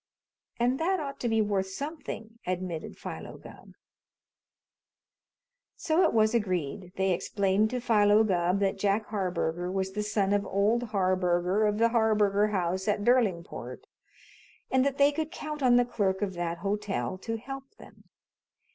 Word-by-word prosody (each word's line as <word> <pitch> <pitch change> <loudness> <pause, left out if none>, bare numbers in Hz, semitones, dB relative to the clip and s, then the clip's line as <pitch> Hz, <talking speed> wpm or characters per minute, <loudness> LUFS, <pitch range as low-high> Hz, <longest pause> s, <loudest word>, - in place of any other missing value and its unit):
"And 245 +3 +1
that 370 +3 +1
ought 280 -2 -5
to 240 - -1
be 225 -1 +3
worth 200 -2 0
something," 230 -3 -7
admitted 180 -3 -4
Philo - - -7
Gubb. - - -14 2.0
So 320 +2 +1
it - - +4
was 220 0 +3
agreed. 185 -4 -2
They 190 0 +1
explained 195 +3 +1
to 250 - -2
Philo 215 -2 +4
Gubb 180 -1 +1
that 195 0 0
Jack 205 +2 +1
Harburger 180 -3 -2
was 190 0 -2
the 210 +2 -3
son 205 -2 0
of 205 0 +2
old 210 +6 +1
Harburger 185 -1 +1
of 210 0 0
the 230 +1 +4
Harburger 210 -3 +3
House 190 -1 -1
at 205 -1 +1
Derlingport, 210 -8 0 0.9
and 260 0 +4
that 275 0 0
they 285 0 +5
could 315 +1 -3
count 305 -3 -6
on 250 -2 +5
the 245 0 +5
clerk 200 -4 -1
of 195 -2 -2
that 170 -1 -3
hotel 205 -1 -2
to 225 +3 -4
help 270 +3 -9
them. - - -16
210 Hz, 155 wpm, -28 LUFS, 190-235 Hz, 2.0 s, they